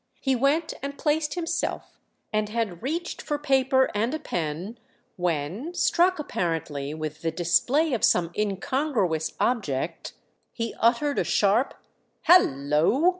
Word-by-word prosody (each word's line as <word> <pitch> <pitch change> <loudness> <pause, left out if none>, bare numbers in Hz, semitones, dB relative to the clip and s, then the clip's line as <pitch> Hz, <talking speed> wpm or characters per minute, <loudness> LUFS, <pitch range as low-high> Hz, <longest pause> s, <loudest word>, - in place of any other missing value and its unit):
He 270 -1 +1
went 285 +6 +1
and 280 0 -5
placed 300 +1 0
himself, 335 -1 -3 0.3
and 215 0 0
had 210 -6 -2
reached 330 +7 -3
for 295 - -2
paper 265 -2 +2
and 225 +7 0
a - - -4
pen 175 - -4 0.4
when, 180 - -2
struck 360 +2 +3
apparently 165 - -3
with 155 0 -5
the 165 - 0
display 245 - +2
of 235 - -1
some 170 -1 +3
incongruous 205 - -1
object, 165 - -1 0.4
he 230 -1 -3
uttered 265 +5 +2
a - - +2
sharp 210 +6 +2 0.5
"Hallo!" 155 - +4
230 Hz, 125 wpm, -26 LUFS, -, 0.5 s, Hallo